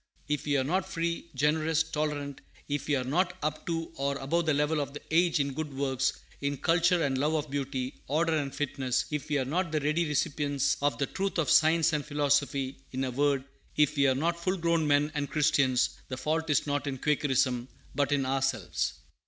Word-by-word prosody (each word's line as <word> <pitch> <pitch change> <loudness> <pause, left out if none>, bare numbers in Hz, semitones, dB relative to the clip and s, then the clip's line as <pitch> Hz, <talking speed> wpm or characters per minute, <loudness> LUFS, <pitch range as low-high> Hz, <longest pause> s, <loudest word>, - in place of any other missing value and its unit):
If 150 0 -1
we 145 -1 +2
are 130 - +2
not 180 +8 -1
free, 170 0 -2
generous, 155 +2 +2
tolerant, 150 -3 -3 0.3
if 145 -1 -2
we 150 - +2
are 130 - 0
not 175 +7 0
up 155 0 -3
to 165 -1 -2
or 140 0 -1
above 160 +5 -1
the 155 - +4
level 150 +1 +1
of 140 0 -5
the - - -6
age 170 -1 +3
in 140 -1 0
good 155 +1 -4
works, 135 -1 +1 0.3
in 140 0 -1
culture 170 +2 +3
and 135 -2 0
love 150 +3 +1
of 150 -2 -2
beauty, 135 -2 -3
order 160 +3 +1
and 140 -3 -1
fitness, 135 -3 -1
if 150 0 -3
we 150 - +2
are 130 - 0
not 165 +5 -1
the 155 - +1
ready 155 +4 +1
recipients 145 -2 0
of 145 0 +1
the 140 - +1
truths 195 +6 -3
of 165 - +1
science 160 0 +5
and 150 -1 0
philosophy, 140 -2 0
in 130 +1 -2
a 130 - -1
word, 140 +1 +1 0.3
if 150 0 +3
we 140 -1 +4
are 130 - +3
not 170 +4 -1
full 185 +1 0
grown 170 -2 +1
men 145 +1 +3
and 145 -2 -2
Christians, 135 -5 +2 0.2
the 130 - -5
fault 160 +4 -1
is 145 - +2
not 145 0 -1
in 135 -1 -2
Quakerism, 130 -3 +1 0.3
but 145 0 0
in 140 -2 +2
ourselves. 130 -7 -1
145 Hz, 210 wpm, -29 LUFS, 135-160 Hz, 0.3 s, science